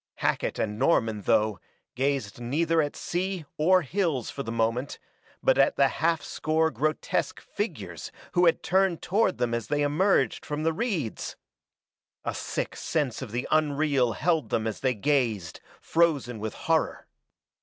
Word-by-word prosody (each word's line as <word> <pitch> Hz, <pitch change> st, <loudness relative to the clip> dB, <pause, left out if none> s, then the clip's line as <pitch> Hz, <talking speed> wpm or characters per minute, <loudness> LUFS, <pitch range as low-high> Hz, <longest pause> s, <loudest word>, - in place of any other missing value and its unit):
Hackett -, -, -1 dB
and 105 Hz, 0 st, -2 dB
Norman, 115 Hz, -7 st, +2 dB
though, 110 Hz, -1 st, +2 dB, 0.3 s
gazed 130 Hz, -5 st, -1 dB
neither 160 Hz, +7 st, +1 dB
at 145 Hz, -1 st, -2 dB
sea 180 Hz, -1 st, -3 dB
or 180 Hz, +4 st, +4 dB
hills 160 Hz, -4 st, -1 dB
for 140 Hz, -, -5 dB
the 115 Hz, -, -4 dB
moment, 115 Hz, +4 st, -1 dB, 0.5 s
but -, -, +4 dB
at 290 Hz, -, +4 dB
the 135 Hz, -1 st, +4 dB
half 165 Hz, +1 st, 0 dB
score 160 Hz, +1 st, 0 dB
grotesque 155 Hz, +1 st, -1 dB
figures -, -, -5 dB, 0.2 s
who 175 Hz, 0 st, +4 dB
had 165 Hz, -, +2 dB
turned 190 Hz, -2 st, +2 dB
toward 195 Hz, +1 st, +2 dB
them 120 Hz, -1 st, 0 dB
as 115 Hz, -2 st, -2 dB
they 145 Hz, 0 st, +1 dB
emerged 145 Hz, -, +2 dB
from 150 Hz, +1 st, -3 dB
the 165 Hz, 0 st, +2 dB
reeds. 170 Hz, -, -2 dB, 0.9 s
A -, -, -1 dB
sick -, -, -3 dB
sense 145 Hz, -7 st, -1 dB
of 125 Hz, -5 st, -6 dB
the 120 Hz, +3 st, -2 dB
unreal 145 Hz, -5 st, +2 dB
held 160 Hz, -, 0 dB
them 110 Hz, -, 0 dB
as 110 Hz, -2 st, -3 dB
they 130 Hz, -2 st, +1 dB
gazed, 110 Hz, -, 0 dB, 0.2 s
frozen 145 Hz, -9 st, +1 dB
with 110 Hz, 0 st, -4 dB
horror. -, -, 0 dB
145 Hz, 155 wpm, -27 LUFS, 120-165 Hz, 0.9 s, or